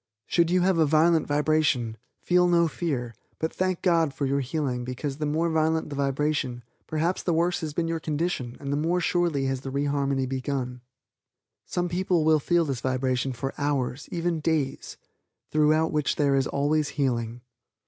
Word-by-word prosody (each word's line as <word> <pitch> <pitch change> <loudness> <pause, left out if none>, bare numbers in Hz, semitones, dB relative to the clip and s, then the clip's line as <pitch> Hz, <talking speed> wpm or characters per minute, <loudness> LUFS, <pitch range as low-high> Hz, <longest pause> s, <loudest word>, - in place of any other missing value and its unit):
Should 170 -1 +2
you 180 +1 +3
have 185 -1 +2
a 160 - +5
violent 160 +2 +3
vibration, 145 -6 +1 0.3
feel 180 0 +4
no 170 -1 +4
fear, 135 -8 -3 0.2
but 160 - -2
thank 185 -1 -1
God 165 -6 +2
for 140 - -1
your 140 +1 +1
healing 130 -2 -2
because 130 +3 -4
the 150 -1 -2
more 165 +3 0
violent 160 -1 +1
the - - -4
vibration 140 -3 -1 0.2
perhaps 165 +4 0
the 170 - 0
worse 175 +2 +1
has 155 -2 -4
been 165 -1 0
your 165 0 -1
condition 150 -6 -2
and 140 0 -3
the - - 0
more 165 +4 +1
surely 170 -6 +1
has 135 -1 -1
the 135 - -5
re 140 +2 -1
harmony 140 -2 0
begun. 130 -1 -3 0.9
Some 175 0 -1
people 175 -2 +1
will 155 -1 +5
feel 170 +3 +2
this 135 -5 -3
vibration 130 0 0
for 135 +2 -4
hours, 140 -2 -1
even 170 -1 -1
days, 150 -3 -2 0.5
throughout 155 +1 +3
which 150 -2 0
there 145 -2 +2
is 135 -1 +2
always 145 +1 +1
healing. 120 -4 -1
150 Hz, 180 wpm, -26 LUFS, 135-165 Hz, 0.9 s, a